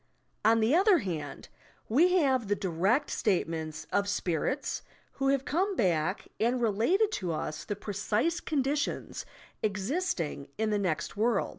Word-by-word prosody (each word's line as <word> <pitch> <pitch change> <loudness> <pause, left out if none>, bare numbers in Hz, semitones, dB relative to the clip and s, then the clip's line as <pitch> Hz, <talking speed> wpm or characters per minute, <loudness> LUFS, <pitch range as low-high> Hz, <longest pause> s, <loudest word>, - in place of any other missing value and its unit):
On 225 +1 +5
the 225 +5 +3
other 380 +3 +6
hand, 160 - -5 0.4
we 330 +11 +4
have 265 - +2
the 205 - +2
direct 195 - +1
statements 160 -6 -1
of 200 0 +1
"spirits" 205 - -1 0.4
who 270 - +3
have 275 -1 +2
come 380 +6 0
back 180 - 0
and 240 +3 +2
related 240 - +2
to 180 - -2
us 155 -1 -3
the 205 - -3
pre 205 +1 -6
cise 225 - 0
conditions 290 -1 -1 0.3
existing 205 - -2
in 220 0 0
the 210 - +1
next 165 -7 -2
world. 220 0 +1
215 Hz, 145 wpm, -29 LUFS, 185-280 Hz, 0.4 s, other